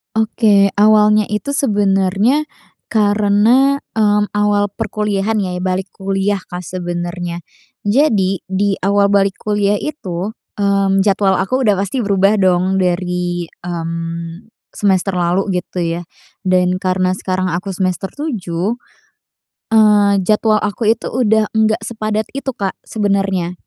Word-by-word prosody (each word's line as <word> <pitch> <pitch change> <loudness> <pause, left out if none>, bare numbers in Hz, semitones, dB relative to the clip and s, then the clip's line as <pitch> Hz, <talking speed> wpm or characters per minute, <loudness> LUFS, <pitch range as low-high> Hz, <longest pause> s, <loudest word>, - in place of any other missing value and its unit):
Oke. 215 -2 +3
Awalnya 210 0 +5
itu 210 +5 -4
sebenernya 205 +4 +1 0.4
karena, 215 +6 +3 0.2
mmm, 210 -1 +2
awal 205 0 +2
perkuliahan 210 0 -2
ya 180 -2 -3
balik 185 +1 -2
kuliah, 195 +1 -1
Kak, 180 -1 -8
sebenernya. 175 0 -5 0.4
Jadi 205 -5 +2
di 195 +1 0
awal 200 +1 +2
balik 200 -1 +2
kuliah 205 -1 +1
itu, 195 - -4 0.3
mmm, 195 -1 +2
jadwal 195 -1 +2
aku 255 +6 0
udah 205 - +4
pasti 200 +5 -2
berubah 200 +1 +3
dong 185 0 +2
dari, 180 -1 -1 0.2
mmm, 165 +1 -5 0.2
semester 190 -2 0
lalu 180 +2 0
gitu 180 - -6
ya. 170 +1 -2 0.4
Dan 180 0 +2
karena 185 0 0
sekarang 185 -1 -2
aku 180 +3 -3
semester 185 0 -2
7, 215 - -3 1.0
eee, 205 -2 +4
jadwal 215 +2 +2
aku 210 +2 -2
itu 230 - -5
udah 220 -3 +2
nggak 220 0 +1
sepadat 215 -1 -2
itu, 275 0 -6
Kak, 195 -2 -2
sebenernya. 195 -4 -1
200 Hz, 120 wpm, -17 LUFS, 185-210 Hz, 1.0 s, Awalnya